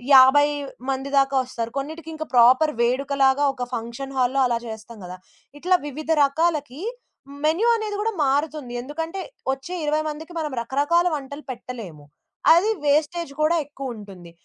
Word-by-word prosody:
50 265 +3 +8 0.4
మంది 270 +1 -3
దాకా 275 0 +1
వస్తారు. 235 -2 -5
కొన్నిటికి 320 +3 -7
ఇంకా 315 0 -5
ప్రాపర్ 255 +6 +6
వేడుకలాగా 270 +2 +2
ఒక 250 - -4
ఫంక్షన్ 235 +4 -6
హాల్‌లో 255 +2 +2
అలా 235 - 0
చేస్తాం 220 +1 -9
గదా. 180 +1 -8 0.4
ఇట్లా 365 +4 +3
వివిధ 300 +3 -7 0.2
రకాలకి 295 -1 -1 0.6
మెన్యూ 330 +9 +2
అనేది 430 -2 -3
కూడా 450 +2 0
మారుతుంది. 285 -2 -1
ఎందుకంటే, 320 +8 -5 0.3
వచ్చే 270 +7 -5
20 305 +1 +1
మందికి 310 +3 -6
మనం 305 -2 -2
రకరకాల 290 +8 +1
వంటలు 285 0 -6
పెట్టలేము. 230 - -8 0.5
అది 350 +6 +4 0.2
వేస్టేజ్ 305 +2 +1
కూడా 310 +2 +3
ఎక్కువుంటుంది. 210 -11 -9
280 Hz, 135 wpm, -23 LUFS, 250-315 Hz, 0.6 s, 50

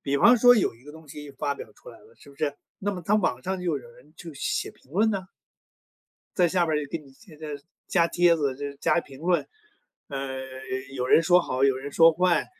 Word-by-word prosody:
比 140 0 -1
方 240 - +6
说 245 +2 +7
有 200 - +1
一 120 - -23
个 150 - -11
东 160 -1 -14
西 145 0 -9
发 140 +1 -3
表 - - -10
出 - - -16
来 - - -12
了， 450 +2 -21
是 140 - -17
不 140 - -19
是？ 145 -1 -1 0.2
那 205 +1 -2
么 180 - -6
它 210 +4 +3
网 130 -11 0
上 190 0 -2
就 - - -7
有 130 - -9
人 125 +6 -18
就 165 -2 -9
写 140 - -2
评 135 - -25
论 215 +4 +3
呐。 195 -3 -3 1.1
在 180 - +5
下 175 0 +1
边 155 - +1
儿 150 - -1
就 145 - -9
给 165 - -4
你 140 -3 -17
添 160 -2 -18
加 155 - -7 0.4
加 170 -2 +3
帖 175 0 +4
子、 140 -5 -1
就 145 +1 -5
加 170 - +2
评 135 -3 -14
论， 175 +1 +1 0.6
呃， 135 -2 -4 0.6
有 125 -1 -2
人 165 - +5
说 180 0 +5
好， 130 -5 -2
有 135 -1 +4
人 135 +2 -6
说 165 +2 +6
坏。 175 -3 +2
155 Hz, 255 characters per minute, -26 LUFS, 140-180 Hz, 1.1 s, 说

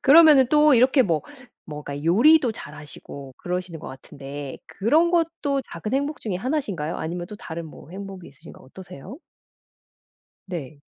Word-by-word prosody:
그러면은 295 -2 +8
또 300 0 +5
이렇게 260 +3 +5
뭐 165 -8 0 0.4
뭐랄까 145 -2 -7
요리도 245 - +5
잘 150 -8 -10
하시고 140 -2 -10
그러시는 180 -1 -4
것 - - -10
같은데 140 +1 -8
그런 305 - +2
것도 325 -5 0
작은 190 +8 -4
행복 285 +2 -1
중에 210 -5 -3
하나신가요? 200 - -2
아니면 175 +2 -4
또 210 - -8
다른 170 -3 -7
뭐 155 - -13
행복이 195 -1 -8
있으신가 135 - -15
어떠세요? 180 - -11 1.3
네. 155 -6 -6
185 Hz, 335 characters per minute, -24 LUFS, -, 1.3 s, 그러면은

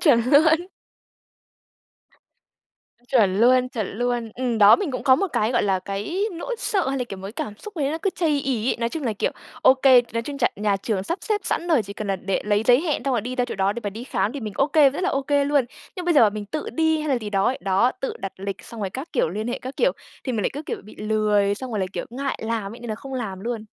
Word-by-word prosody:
Chuẩn 265 -9 +5
luôn. 320 +4 +5 2.4
Chuẩn 210 -7 +3
luôn, 255 +1 +5
chuẩn 225 -5 -3
luôn. 240 -2 -1
Ừm, 245 -3 -1
đó, 205 0 +8
mình 395 -7 -2
cũng 255 - -4
có 260 -2 +6
một 395 - 0
cái, 215 +3 +1
gọi - - +2
là, 195 -2 +2
cái 205 - -3
nỗi 360 +8 -4
sợ 385 - 0
hay 270 0 -1
là, 250 - -1
kiểu, 200 - -8
một 190 - -10
cái 205 - -7
cảm 215 -3 -5
xúc 425 -2 -10
gì 300 - -1
đấy 275 - +1
nó 320 - -2
cứ 390 - +2
chây 310 -5 +1
ỳ 255 -4 -1
ấy. - - +1
Nói 235 0 0
chung 315 +4 -5
là, 235 - 0
kiểu, 205 - -1 0.3
ô 260 - +7
kê, 260 -2 +6
nói 230 0 -1
chung 280 +3 -6
chà - - +3
nhà 205 -1 +1
trường 195 -1 -2
sắp 340 - -3
xếp 425 -1 0
sẵn 345 - -1
rồi, 305 -9 +4
chỉ 200 0 -8
cần 210 0 -6
là 195 -1 0
đệ 190 +1 -2
lấy 205 0 +2
giấy 245 +1 +6
hẹn 310 -3 -1
xong 275 - +1
rồi 235 - +1
đi 250 +4 -5
ra 250 - +2
chỗ 245 - -5
đó 195 0 +1
để 235 - -6
mà 205 - -1
đi 225 +5 -8
khám 225 -4 -1
thì 285 - -5
mình 215 -3 -5
ô 275 - +3
kê, 300 -3 +5
rất 285 - -5
là 375 - +1
ô 275 - 0
kê 285 +1 +2
luôn. 285 -2 +2 0.3
Nhưng 360 - -4
bây 345 -1 +2
giờ 290 - +7
mà 215 - +5
mình 210 0 -5
tự 305 +8 -4
đi 320 -1 +2
hay 305 - -3
là 265 -3 +2
gì 215 -3 -6
đó 195 -1 +1
ấy, 260 - 0
đó, 195 +6 +2
tự 270 - -3
đặt 195 - -5
lịch 195 0 -4
xong 230 - -9
rồi 195 -2 -2
các 265 - -6
kiểu, 250 - +2
liên 210 +7 -4
hệ 245 - -2
các 260 +2 -8
kiểu - - +3 0.3
thì 255 - -2
mình 220 -3 -1
lại - - 0
cứ, 290 - -5
kiểu, - - -5
bị 215 - -14
lười 210 -2 +1
xong 255 +4 -7
rồi 215 - -2
lại, 190 -1 -1
kiểu, - - -3
ngại 270 +3 -3
làm 220 -3 -2
ấy, 235 - -12
nên 240 - -7
là 215 - -2
không 270 +4 -8
làm 205 -7 -4
luôn. 230 0 -4
245 Hz, 295 wpm, -23 LUFS, 210-280 Hz, 2.4 s, đó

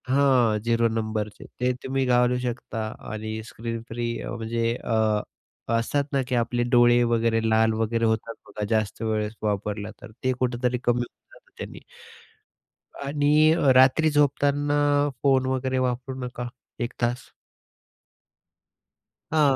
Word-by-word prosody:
हां, 130 -5 +3
झिरो 115 +1 +2
नंबरचे. 110 -2 -3
ते 125 +1 +2
तुम्ही 135 0 0
घालू 125 0 +3
शकता 120 -2 -4 0.3
आणि 110 0 -4
स्क्रीन 115 0 -5
फ्री 120 +1 -3 0.2
अ, - - -6
म्हणजे 115 0 -1
अ, 110 -2 +1 0.5
असतात 115 +5 +1
ना 135 - +2
की 130 - -1
आपले 120 0 0
डोळे 120 -1 +5
वगैरे, 115 0 +2
लाल 110 0 +3
वगैरे 115 +1 0
होतात 110 +1 0
बघा 105 - -5
जास्त 110 -1 0
वेळेस 110 -1 -1
वापरलं 105 0 -2
तर. - - -11
ते 130 - +2
कुठेतरी 125 0 0
कमी 120 0 +2
होऊन 120 - -9
जातं - - -20
त्यानी. - - -8 1.2
आणि 150 +2 +3
अ, 145 -5 +3
रात्री 130 +5 +5
झोपताना 145 0 +2 0.4
फोन 135 -2 +3
वगैरे 130 0 -1
वापरू 125 +2 -4
नका 125 0 -5 0.3
1 120 +1 -2
तास. 120 +1 -1 2.0
हां. 145 -4 +4
120 Hz, 135 wpm, -25 LUFS, 110-130 Hz, 2.0 s, डोळे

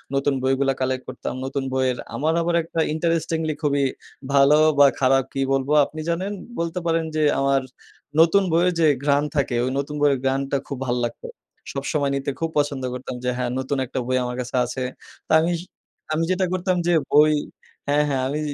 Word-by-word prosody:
নতুন 140 +1 +1
বইগুলা 135 +1 +2
কালেক্ট 130 0 -1
করতাম। - - -5
নতুন 135 +1 -3
বইয়ের 130 -1 +1 0.2
আমার 155 +3 +1
আবার 170 0 0
একটা 165 0 -5
interestingly 160 -1 0
খুবই 140 -2 +1 0.5
ভালো 140 +1 +6 0.2
বা, 145 - +9
খারাপ 135 0 +3
কি 135 - -3
বলবো 135 +1 0
আপনি 155 - -10
জানেন? 185 +4 -1 0.3
বলতে 170 +1 -2
পারেন 165 -1 +1
যে, 155 - +1 0.2
আমার 135 0 +2 0.6
নতুন 170 +5 +5
বইয়ের 175 +2 +3
যে 160 - +5 0.2
ঘ্রান 145 0 +3
থাকে, 140 -4 0
ওই 130 - -1
নতুন 145 +1 -4
বইয়ের 140 -2 +3
ঘ্রাণটা 135 +1 0
খুব 140 - -5
ভালো 120 0 0
লাগতো। 115 - -7 0.4
সবসময় 140 0 -1
নিতে 140 0 -2
খুব 165 0 -1
পছন্দ 145 -2 0
করতাম 125 0 -6
যে, 125 - 0
হ্যাঁ, 125 -1 -1
নতুন 130 +2 -2
একটা 130 - -4
বই 130 0 +1
আমার 125 0 -4
কাছে 120 +1 -6
আছে। 125 +2 -5 0.5
তা - - -7
আমিস 170 +1 0 0.6
আমি 160 +1 +1
যেটা 185 0 +1
করতাম 185 0 0
যে 175 - +3 0.2
বই 150 +1 +6 0.5
হ্যাঁ, 145 +1 +3
হ্যাঁ। 135 -2 0
আমি 145 +3 -2
140 Hz, 185 wpm, -23 LUFS, 135-160 Hz, 0.6 s, বা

